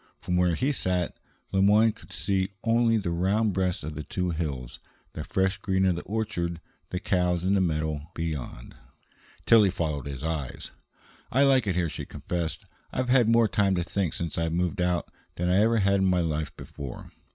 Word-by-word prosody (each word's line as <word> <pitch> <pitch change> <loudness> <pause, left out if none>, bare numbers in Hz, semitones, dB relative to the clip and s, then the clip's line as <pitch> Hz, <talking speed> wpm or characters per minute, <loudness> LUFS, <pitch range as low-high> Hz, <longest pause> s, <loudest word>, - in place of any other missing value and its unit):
From 90 - -2
where 90 -1 +3
he 135 - +1
sat, 90 - -1 0.4
Le 95 - +2
Moyne 105 +3 +5
could - - -16
see 95 +3 -1
only 115 0 +3
the 95 -5 -2
round 100 +5 +1
breasts 95 -2 -1
of 75 +1 -5
the 75 - -4
two 90 +1 -2
hills, 70 -7 -4 0.3
the 75 - -5
fresh 95 +3 0
green 95 -1 +1
of 90 -2 +3
the 85 - -4
orchard 95 -6 -2 0.3
the 90 - -3
cows 90 -3 +1
in 95 +2 +2
a 95 - +3
meadow 80 -3 -1
beyond. 75 -7 -5 0.7
Tillie 110 -4 +6
followed 80 -6 -2
his 70 -1 -6
eyes. 80 -5 -4 0.6
"I 135 +3 +4
like 135 -5 +4
it 95 - +1
here," 90 -1 +1
she - - -6
confessed. 85 -3 -4 0.3
"I've 130 0 -2
had 125 -3 +5
more 115 -1 +5
time 100 -2 +2
to 90 - 0
think 90 -1 -2
since 85 -1 -3
I 80 0 0
moved 90 +2 -1
out 90 -1 0 0.3
than 90 +1 0
I 95 - +4
ever 115 +1 +3
had 100 -1 +3
in 95 - +2
my 90 -1 +3
life 80 -2 -2
before. 70 -3 -8
90 Hz, 195 wpm, -27 LUFS, 80-100 Hz, 0.7 s, Tillie